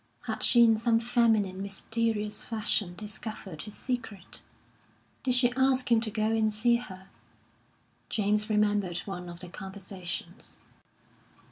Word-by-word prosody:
Had - - -4
she 240 -2 +6
in 225 -1 +5
some 225 0 +2
feminine, 225 -5 +2
mysterious 210 +1 -1
fashion 210 -5 +1
discovered 205 -4 -5
his 210 - -9
secret? 225 -7 -5 0.8
Did 255 -2 +2
she 245 -1 +3
ask 260 -1 +2
him 230 -1 +5
to 225 - -3
go 215 +1 0
and 220 -1 +2
see 235 +3 +4
her? 190 -5 -10 1.0
James 210 +1 +2
remembered 205 -4 +1
one 180 -3 -6
of 175 0 -9
their 180 -1 -9
conversations. 190 -2 -5
215 Hz, 130 wpm, -29 LUFS, 195-230 Hz, 1.0 s, she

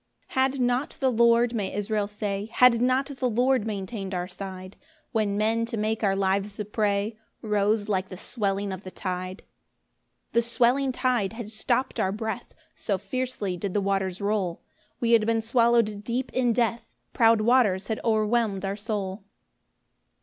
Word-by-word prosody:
1 - - -15 0.2
Had 275 - -6
not 245 +3 0
the 265 -2 +2
Lord, 235 +1 +4
may 205 -4 -2
Israel 205 0 -1
say, 205 0 -4
Had 250 -2 +5
not 255 +2 +2
the 265 -3 -2
Lord 245 0 +2
maintain'd 195 -1 -4
our 180 0 -2
side, 185 -1 -8 0.4
When 210 -3 0
men 225 +2 +1
to 230 - -4
make 215 +1 -1
our 195 -2 +3
lives 195 +1 0
a 210 - -2
prey, 210 +1 -1 0.2
Rose 210 0 +1
like 190 -2 -1
the 185 - -8
swelling 200 -2 -2
of 190 +1 -8
the 185 - -7
tide; 185 +1 -5 0.9
2 235 - +5
The - - +3
swelling 245 +3 +2
tide 245 -6 0
had 225 -2 -6
stopt 240 +4 -1
our 190 - +1
breath, 220 +3 -5 0.2
So 200 - -1
fiercely 215 -4 -3
did 190 +2 -4
the - - +4
waters 195 -2 -1
roll, 200 -4 -1 0.4
We 235 -1 +1
had 225 -2 +5
been 230 0 +2
swallow'd 230 -2 +2
deep 245 +3 -3
in 250 -2 +2
death; 235 0 -1 0.2
Proud 225 -1 +4
waters 215 -5 +3
had 220 - -2
o'erwhelm'd 215 -3 +1
our 195 +1 -2
soul. 200 -2 -4
215 Hz, 170 wpm, -26 LUFS, 200-235 Hz, 0.9 s, Had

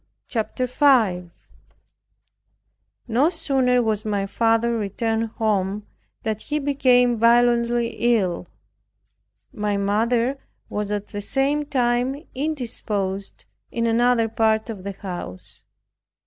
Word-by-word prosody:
CHAPTER 240 +1 -2
5 235 -10 +3 1.8
No 250 +7 +3
sooner 260 -7 +1
was 215 -2 0
my 205 -3 -1
father 230 +3 +1
returned 225 +2 -1
home, 205 -2 0 0.4
than 220 -2 -1
he 295 +6 -3
became 255 -4 +3
violently 235 0 +3 0.3
ill. 185 -4 -2 1.1
My 210 -4 -1
mother 230 +6 +1 0.3
was 210 0 -3
at 205 0 -3
the 205 - -5
same 280 +6 0
time 250 -1 +1 0.2
indisposed 225 -9 -3 0.3
in 230 -1 -1
another 230 0 +3
part 220 0 +1
of 195 -4 -9
the 200 0 -4
house. 95 - -8
230 Hz, 105 wpm, -23 LUFS, 205-250 Hz, 1.8 s, 5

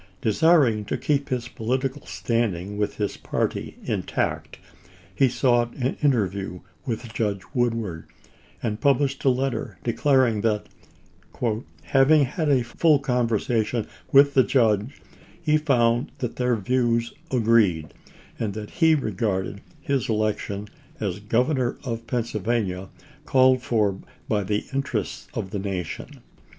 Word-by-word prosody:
Desiring 125 -2 +3
to - - -2
keep 140 -1 0
his 125 -2 -2
political 130 +4 -2
standing 105 -5 -1
with 105 0 -1
his 105 -1 -2
party - - -3
intact, - - -2 0.6
he 130 +7 +3
sought 120 -1 +2
an 130 0 -1
interview 100 - 0 0.3
with 115 -1 -4
Judge 105 -4 -1
Woodward, 115 -9 -1 0.6
and 110 -1 -2
published 140 0 +2
a - - +6
letter 125 -6 -1
declaring 120 -2 +2
that, 105 -2 0 0.6
" 115 0 -4
having 140 +2 +5
had 155 +4 -2
a 130 -4 +3
full 150 +6 +3
conversation 120 -4 0 0.3
with 140 +1 +6
the 130 - +6
judge, 115 0 +1 0.4
he 155 -2 +2
found 120 -5 +2
that 125 -2 -4
their 125 -1 +2
views 115 +1 0 0.2
agreed, 110 -10 +2 0.5
and 105 -3 -2
that 105 -1 -6
he 160 -2 +4
regarded 100 -6 -2 0.2
his 140 -3 -1
election 105 -1 -1 0.3
as 100 -2 -2
Governor 125 +4 +1
of 115 -3 -4
Pennsylvania 110 -5 -1 0.4
called 130 -1 +4
for 105 -6 +1 0.3
by 105 -2 +1
the 105 +2 -1
interests 135 0 -2
of 95 - -4
the 100 - -2
nation." 95 -4 -5
115 Hz, 125 wpm, -24 LUFS, 105-130 Hz, 0.6 s, a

